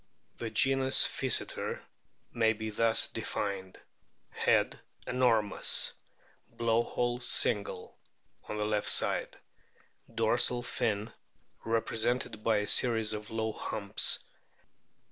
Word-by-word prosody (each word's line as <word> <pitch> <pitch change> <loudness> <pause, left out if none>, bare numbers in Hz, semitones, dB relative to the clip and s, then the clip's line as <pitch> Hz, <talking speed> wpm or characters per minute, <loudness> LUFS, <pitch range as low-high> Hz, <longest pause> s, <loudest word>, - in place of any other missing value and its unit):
The 115 - -4
genus 135 +3 +4
PHYSETER} 130 -5 0 0.5
may 115 -2 +2
be 110 0 -6
thus 115 +1 +3
denned: 95 -2 -5 0.5
Head - - +1 0.3
enormous; 115 -5 +1 0.6
blow 115 0 +1
hole 120 +1 -2
single, 105 -4 0 0.5
on 105 - -4
left 105 0 -1
side; - - +1 0.7
dorsal 120 +2 +1
fin 110 -2 -2 0.5
represented 115 0 -1
by 110 -2 +2
a 105 0 -2
series 110 -3 +4
of 105 0 -6
low 110 0 -2
humps. 100 -2 -1
110 Hz, 95 wpm, -30 LUFS, 105-120 Hz, 0.7 s, genus